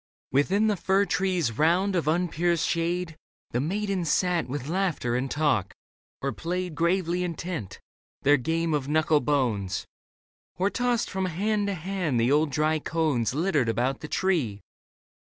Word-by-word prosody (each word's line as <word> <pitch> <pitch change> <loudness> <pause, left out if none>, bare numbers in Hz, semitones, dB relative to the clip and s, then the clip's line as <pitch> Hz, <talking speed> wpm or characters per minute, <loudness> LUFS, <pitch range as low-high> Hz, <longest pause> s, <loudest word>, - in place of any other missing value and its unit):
Within 185 +11 +2
the 215 -1 +2
fir 195 +2 +2
tree's 180 - 0
round 180 +5 +3
of 170 -4 0
unpierced 170 0 +1
shade 170 0 -1 0.4
The 120 - 0
maidens 190 0 -1
sat 180 -2 +1
with 135 +1 -4
laughter 165 -9 0
and 130 +2 -1
talk, 140 -11 0 0.5
or 140 - 0
played, 180 +2 -3
Gravely 175 +2 +1
intent, 170 - -5 0.4
their 145 +1 +5
game 165 +5 -1
of 145 -3 -1
knuckle 155 0 +3
bones; 120 -9 0 0.7
Or 190 +3 +1
tossed 245 -1 0
from 190 -1 -1
hand 205 +4 0
to 200 - -1
hand 175 -6 -1
the 120 +3 +2
old 150 +2 +3
dry 155 +3 +1
cones 145 -8 0
Littered 155 -7 +1
about 125 +4 0
the 150 - -7
tree. 150 - 0
165 Hz, 150 wpm, -26 LUFS, 145-185 Hz, 0.7 s, their